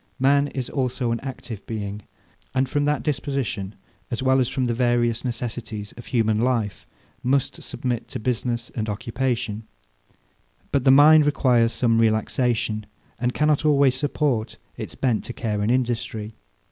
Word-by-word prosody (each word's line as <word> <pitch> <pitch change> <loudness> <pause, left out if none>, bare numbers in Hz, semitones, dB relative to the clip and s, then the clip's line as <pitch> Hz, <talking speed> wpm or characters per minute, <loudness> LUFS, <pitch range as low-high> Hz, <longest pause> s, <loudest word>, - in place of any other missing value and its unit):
Man 140 +2 +3
is 130 -3 -4
also 125 -3 -1
an 115 - -1
active 125 -6 -7
being; 105 -2 -4 0.5
and 130 0 +2
from 145 +2 0
that 150 0 0
disposition, 135 -8 -2 0.3
as 120 +1 -3
well 130 0 +4
as 125 -1 +2
from 130 -1 -1
the 120 - 0
various 120 -1 +1
necessities 115 -4 -4
of 120 - -11
human 110 -3 +1
life, 115 - -1 0.3
must 135 +1 0
submit 120 -3 -3
to - - -5
business 120 +1 -2
and 110 -2 -3
occupation: 115 0 -2 1.0
But 140 -2 +1
the - - +6
mind 150 +2 +7
requires 120 -5 +3
some 115 -1 +2
relaxation, 110 -1 +1 0.3
and 125 +1 -1
cannot 150 -1 +2
always 140 -3 +4
support 130 -4 -1 0.2
its - - -7
bent 120 -5 0
to 120 - -5
care 105 -3 -2
and 105 - 0
industry. 115 -3 -1
120 Hz, 150 wpm, -24 LUFS, 110-135 Hz, 1.0 s, mind